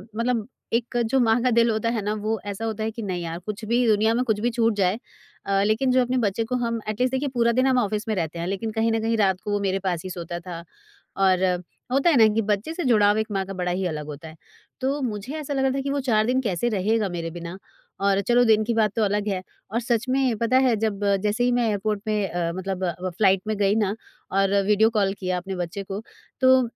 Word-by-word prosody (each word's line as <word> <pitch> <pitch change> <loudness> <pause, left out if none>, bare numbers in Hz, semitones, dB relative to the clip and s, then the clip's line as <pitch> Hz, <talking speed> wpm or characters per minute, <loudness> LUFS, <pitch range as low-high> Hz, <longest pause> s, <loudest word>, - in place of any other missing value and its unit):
मतलब 230 -1 0 0.3
एक 240 +1 0
जो 270 - +3
माँ 230 -1 +3
का 255 - +3
दिल 235 0 +4
होता 220 +1 0
है 230 -2 -1
ना? 205 +1 -1
वो 215 +1 -2
ऐसा 205 +2 -4
होता 220 -1 -3
है 220 - -1
कि 230 - -7
नहीं 185 -4 -3
यार 165 0 -5
कुछ 215 +1 -5
भी 240 +3 +2
दुनिया 220 +1 +3
में 245 +2 +1
कुछ 220 -4 0
भी 235 +3 +1
छूट 230 -1 +2
जाए 190 0 +1 0.5
अ, 195 0 +2
लेकिन 220 +5 +2
जो 255 0 +4
अपने 250 +1 0
बच्चे 205 +3 0
को 250 +3 -2
हम 230 0 -1
एटलीस्ट 250 +4 0
देखिए 275 +2 0
पूरा 235 -1 +3
दिन 255 +3 +2
हम 260 -1 +3
ऑफिस 210 -1 -1
में 220 - 0
रहते 170 -2 -3
हैं। 170 - -3
लेकिन 200 +4 -3
कहीं 225 +1 +1
न 225 - +1
कहीं 225 +1 0
रात 190 -3 +2
को 210 - -4
वो 205 - +1
मेरे 195 -1 0
पास 180 -3 -2
ही 185 - -5
सोता 175 -1 -5
था, 170 -1 -8 0.5
और 190 -1 +3 0.5
होता 275 +6 +3
है 325 - +4
ना 220 -2 +7
कि 225 - +2
बच्चे 210 +8 -1
से 350 - -3
जुड़ाव 210 -4 +4
एक 220 0 0
माँ 195 -1 -1
का 195 - -7
बड़ा 180 -1 -2
ही 185 +1 -1
अलग 155 -3 -4
होता 150 +1 -8
है। 155 - -13 0.5
तो 275 +3 0
मुझे 230 +1 -4
ऐसा 295 -2 -4
लग 270 - 0
रहा 265 - +2
था 270 +1 -1
कि 275 - -3
वो 285 +1 0
4 215 -1 +3
दिन 255 +3 +1
कैसे 220 0 -1
रहेगा 215 0 +1
मेरे 170 -2 -4
बिना? 170 +2 -7 0.4
और 200 0 +2
चलो 240 +4 +3
दिन 220 -1 +4
की 235 +2 -1
बात 220 -3 +2
तो 225 - +2
अलग 205 0 0
है 190 -3 -1 0.3
और 230 - 0
सच 235 0 0
में 260 -2 +2
पता 230 +4 +2
है 245 -3 +3
जब 215 -2 -1 0.2
जैसे 210 +3 +1
ही 245 - +3
मैं 245 -1 +2
एयरपोर्ट 210 0 -1
पे 210 -2 0
अ, 170 -1 -2
मतलब 190 0 -3 0.3
फ्लाइट 195 -3 +4
में 215 - 0
गई 200 0 +2
ना 210 -2 +1 0.4
और 195 0 +2
वीडियो 210 +2 +4
कॉल 205 -4 +1
किया 185 -1 -1
अपने 190 +2 -5
बच्चे 180 +2 -4
को। 195 +2 -5 0.4
तो 260 0 +6
215 Hz, 260 wpm, -24 LUFS, 195-235 Hz, 0.5 s, ना